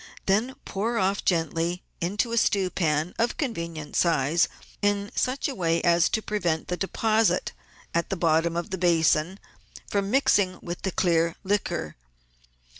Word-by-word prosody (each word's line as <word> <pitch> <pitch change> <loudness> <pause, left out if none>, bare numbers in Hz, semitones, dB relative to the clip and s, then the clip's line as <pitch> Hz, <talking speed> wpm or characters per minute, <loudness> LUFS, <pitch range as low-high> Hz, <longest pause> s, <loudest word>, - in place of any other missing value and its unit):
Then 220 +7 +1
pour 225 +4 -2
off 195 0 +1
gently 170 +1 0 0.2
into 205 +7 -1
a 235 - -1
stew 195 -4 +1
pan 155 -1 0
of 230 +1 +1
convenient 170 - -4
size 165 -1 +3 0.3
in 205 0 0
such 260 +2 0
a 280 - -3
way 170 -6 +1
as 170 -1 +4
to 220 - -1
prevent 175 -7 -1
the 180 - 0
deposit 215 +4 +1 0.4
at 170 - 0
the 195 - -2
bottom 165 0 +2
of 170 - -4
the 190 - -3
basin 170 +1 +2 0.5
from 200 -1 -1
mixing 205 -7 +3
with 175 0 -6
the 190 - -2
clear 170 -1 +1
liquor. 190 - -2
180 Hz, 150 wpm, -26 LUFS, 165-205 Hz, 0.5 s, as